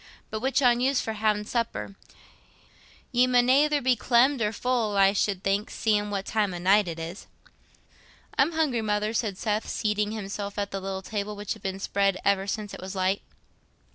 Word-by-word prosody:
But 215 Hz, -, -3 dB
which 265 Hz, +4 st, +1 dB
on 240 Hz, -1 st, +5 dB
you's 265 Hz, +1 st, +2 dB
for 220 Hz, -, -3 dB
ha'in' 210 Hz, -1 st, 0 dB
supper? 230 Hz, -3 st, -3 dB, 1.2 s
Ye 250 Hz, 0 st, +4 dB
mun 245 Hz, -1 st, +3 dB
ayther 295 Hz, +2 st, +4 dB
be 255 Hz, 0 st, +4 dB
clemmed 245 Hz, +3 st, +3 dB
or 210 Hz, -1 st, +1 dB
full, 225 Hz, -2 st, -1 dB
I 195 Hz, 0 st, +5 dB
should 200 Hz, -2 st, 0 dB
think, 200 Hz, +2 st, 0 dB
seein' 210 Hz, -2 st, 0 dB
what 200 Hz, -1 st, -3 dB
time 205 Hz, -4 st, 0 dB
o' -, -, -4 dB
night 195 Hz, +3 st, +3 dB
it 165 Hz, -1 st, -4 dB
is." 165 Hz, +4 st, -7 dB, 1.1 s
"I'm 295 Hz, +5 st, +3 dB
hungry, 300 Hz, -8 st, +1 dB
Mother," 210 Hz, 0 st, -1 dB
said 215 Hz, -4 st, -1 dB
Seth, 215 Hz, 0 st, -2 dB
seating 210 Hz, -1 st, 0 dB
himself 205 Hz, -1 st, -5 dB
at 200 Hz, -1 st, -2 dB
the 195 Hz, -, -4 dB
little 190 Hz, 0 st, -4 dB
table, 210 Hz, +1 st, -4 dB
which 205 Hz, 0 st, -4 dB
had -, -, -14 dB
been 190 Hz, 0 st, -3 dB
spread 195 Hz, -1 st, +1 dB
ever 200 Hz, -1 st, +2 dB
since 205 Hz, 0 st, -4 dB
it -, -, -8 dB
was 190 Hz, +1 st, -7 dB
light. 190 Hz, +1 st, 0 dB
210 Hz, 190 wpm, -26 LUFS, 195-235 Hz, 1.2 s, on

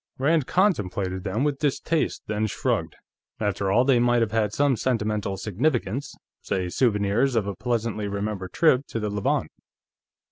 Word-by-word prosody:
Rand 150 Hz, +1 st, +2 dB
contemplated 100 Hz, -, 0 dB
them 105 Hz, +7 st, -1 dB
with 145 Hz, -2 st, 0 dB
distaste, 155 Hz, +2 st, 0 dB
then 110 Hz, 0 st, -1 dB
shrugged. -, -, -1 dB, 0.4 s
After 100 Hz, -2 st, -1 dB
all, 120 Hz, +5 st, +4 dB
they 130 Hz, -3 st, +4 dB
might 120 Hz, 0 st, +3 dB
have 110 Hz, -, -2 dB
had 110 Hz, -2 st, +1 dB
some 140 Hz, +3 st, +2 dB
sentimental 105 Hz, -5 st, -1 dB
significance; 120 Hz, -, -1 dB, 0.3 s
say 90 Hz, -2 st, -2 dB
souvenirs 110 Hz, +4 st, +1 dB
of 110 Hz, -3 st, +2 dB
a 100 Hz, -, -3 dB
pleasantly 115 Hz, -3 st, -2 dB
remembered 100 Hz, -2 st, -3 dB
trip 145 Hz, -5 st, +3 dB
to 115 Hz, -, -4 dB
the 105 Hz, -1 st, -2 dB
Levant. 105 Hz, -1 st, 0 dB
110 Hz, 150 wpm, -25 LUFS, 100-130 Hz, 0.4 s, all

